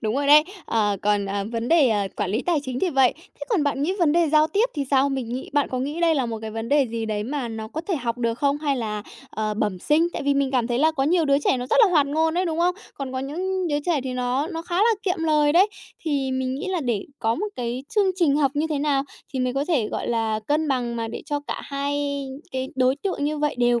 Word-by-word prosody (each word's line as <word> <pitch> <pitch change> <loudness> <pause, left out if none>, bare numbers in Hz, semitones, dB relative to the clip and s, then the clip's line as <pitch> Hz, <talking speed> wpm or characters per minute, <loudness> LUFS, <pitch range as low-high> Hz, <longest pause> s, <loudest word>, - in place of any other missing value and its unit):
Đúng 220 +1 -1
rồi 280 +1 0
đấy. 300 +1 +8 0.2
Ờ, 205 -3 +1
còn, 205 -1 +1
ờ, 200 0 -2
vấn 230 +1 -2
đề 305 -8 +5 0.3
quản 185 - -1
lý 225 +6 0
tài 335 -5 +1
chính 255 -2 -4
thì 365 - +1
vậy. 265 -3 +4
Thế 370 - -23
còn 395 -10 +2
bạn 280 -1 0
nghĩ 355 +5 +1
vấn 315 -4 +3
đề 335 -2 +3
giao 305 +1 +5
tiếp 405 +9 +2
thì 285 -2 -1
sao? 275 0 +4
Mình 265 -4 -3
nghĩ 250 +2 -5
bạn 290 -1 +2
có 255 - -3
nghĩ 290 +6 -3
đây 330 -2 +4
là 260 -4 0
một 225 -1 -4
cái 220 - -5
vấn 225 +1 -5
đề 285 -2 +3
gì 230 -1 -3
đấy 210 -1 -2
mà 265 -2 -3
nó 220 -1 -6
có 315 - -4
thể 360 - +1
học 240 -2 -3
được 230 -1 0
không, 285 0 +1
hay 285 -3 0
là, 210 -3 -3 0.3
ờ, 215 -1 -2
bẩm 205 -3 -1
sinh? 320 - +2
Tại - - -4
vì 280 0 +2
mình 275 -1 +1
cảm 250 -3 +1
thấy 240 0 -1
là 315 +2 +4
có 270 -3 -1
nhiều 335 +1 +3
đứa 280 -1 +3
trẻ 280 - +1
nó 250 0 -4
rất - - +1
là 385 - +2
hoạt 295 -5 +4
ngôn 320 +3 +1
đấy, 365 +1 +1
đúng 325 -1 -2
không? 355 +1 +2 0.2
Còn 270 -2 -5
có 260 - -2
những 360 +6 -2
đứa 290 -1 +1
trẻ 330 -5 +2
thì 255 - -3
nó 250 +4 -1
nó 330 -2 -5
khá 350 0 -4
là 445 +3 +4
kiệm 365 -3 0
lời 300 -2 +3
đấy. 380 +5 +5 0.4
Thì 280 -4 0
mình 260 0 -1
nghĩ 275 - -4
là 365 -3 -1
để 235 -7 -1
có 225 +1 +1
một 415 +5 -2
cái 245 +1 -3
chương 400 -3 +3
trình 300 -6 +3
học 280 -3 +3
như 305 +2 +1
thế 295 - 0
nào 280 -2 +1 0.3
thì 260 - -3
mới 250 0 0
có 275 +2 -1
thể, 255 -11 +1
gọi - - -3
là, 225 -2 0
cân 305 +1 +1
bằng 240 -3 -1
mà 225 -1 -3
để - - -6
cho 290 -2 -1
cả - - -4
hai 280 0 -2 0.3
cái 260 0 -2
đối 255 +1 +3
tượng 340 -4 -2
như 300 0 -1
vậy 295 0 0
đều 240 -1 +3
280 Hz, 285 wpm, -24 LUFS, 245-310 Hz, 0.4 s, đấy